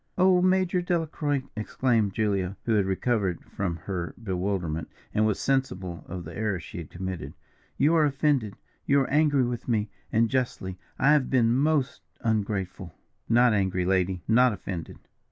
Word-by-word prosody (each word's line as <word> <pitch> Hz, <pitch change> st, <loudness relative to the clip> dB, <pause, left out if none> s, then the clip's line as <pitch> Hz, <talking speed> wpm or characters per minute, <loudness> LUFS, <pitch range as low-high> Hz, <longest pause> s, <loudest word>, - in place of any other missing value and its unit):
"Oh, 185 Hz, -1 st, +5 dB
Major 185 Hz, -1 st, +2 dB
Delacroix!" 155 Hz, -5 st, -1 dB
exclaimed 110 Hz, -2 st, 0 dB
Julia, 100 Hz, -3 st, 0 dB
who 115 Hz, -, +1 dB
had 100 Hz, -3 st, +2 dB
recovered 95 Hz, -3 st, 0 dB
from 95 Hz, -4 st, -3 dB
her 90 Hz, -4 st, -4 dB
bewilderment, 90 Hz, -6 st, -2 dB, 0.2 s
and 110 Hz, 0 st, +3 dB
was 105 Hz, -, 0 dB
sensible 95 Hz, -11 st, -1 dB
of 90 Hz, 0 st, -6 dB
the 85 Hz, +1 st, -9 dB
error 105 Hz, -4 st, -1 dB
she 85 Hz, -, -8 dB
had 80 Hz, -, -8 dB
committed, 95 Hz, -1 st, -6 dB, 0.4 s
"you 150 Hz, +4 st, +4 dB
are 160 Hz, -2 st, +5 dB
offended, 135 Hz, -7 st, +1 dB, 0.3 s
you 140 Hz, -, +5 dB
are 135 Hz, -, -2 dB
angry 145 Hz, -2 st, +4 dB
with 120 Hz, -1 st, -3 dB
me, 110 Hz, -3 st, 0 dB, 0.2 s
and 115 Hz, +1 st, +3 dB
justly 110 Hz, -7 st, -2 dB, 0.2 s
I 135 Hz, -, +4 dB
have 150 Hz, -4 st, +3 dB
been 120 Hz, -3 st, +3 dB
most 140 Hz, 0 st, +1 dB, 0.2 s
ungrateful." 100 Hz, -6 st, -2 dB, 0.3 s
"Not 120 Hz, 0 st, +5 dB
angry, 95 Hz, -3 st, +1 dB
lady 95 Hz, -1 st, +1 dB
not 125 Hz, +2 st, +5 dB
offended. 90 Hz, -4 st, -6 dB
110 Hz, 155 wpm, -27 LUFS, 95-135 Hz, 0.4 s, Oh